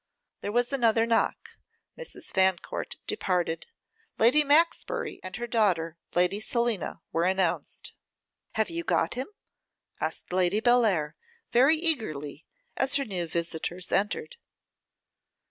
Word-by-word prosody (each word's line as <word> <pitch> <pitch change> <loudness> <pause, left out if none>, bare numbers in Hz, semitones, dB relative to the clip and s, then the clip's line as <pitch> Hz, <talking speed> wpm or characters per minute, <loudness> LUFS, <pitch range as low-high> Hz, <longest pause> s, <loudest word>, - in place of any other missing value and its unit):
There 205 - -3
was 245 +4 +1
another 230 -3 +3
knock. 230 0 0 0.4
Mrs. - - -6
Fancourt 190 -2 0
departed. 180 - -1 0.5
Lady 250 +7 +5
Maxbury, 310 +4 +1
and 185 -1 -7
her 240 - -3
daughter, 185 -9 +1 0.2
Lady 180 +3 +2
Selina, 235 -2 -1
were 165 +1 +1
announced. 190 -2 -1 0.6
'Have 220 +5 0
you 335 0 -3
got - - +1
him?' 255 +2 -4 0.7
asked - - -4
Lady 185 +2 +2
Bellair, 220 -11 +3 0.4
very 270 +6 +5
eagerly, 215 - -2 0.3
as 270 +1 +1
her 280 -1 +1
new 180 -5 -3
visitors 170 +2 -3
entered. 455 - -1
215 Hz, 115 wpm, -28 LUFS, 180-250 Hz, 0.7 s, Lady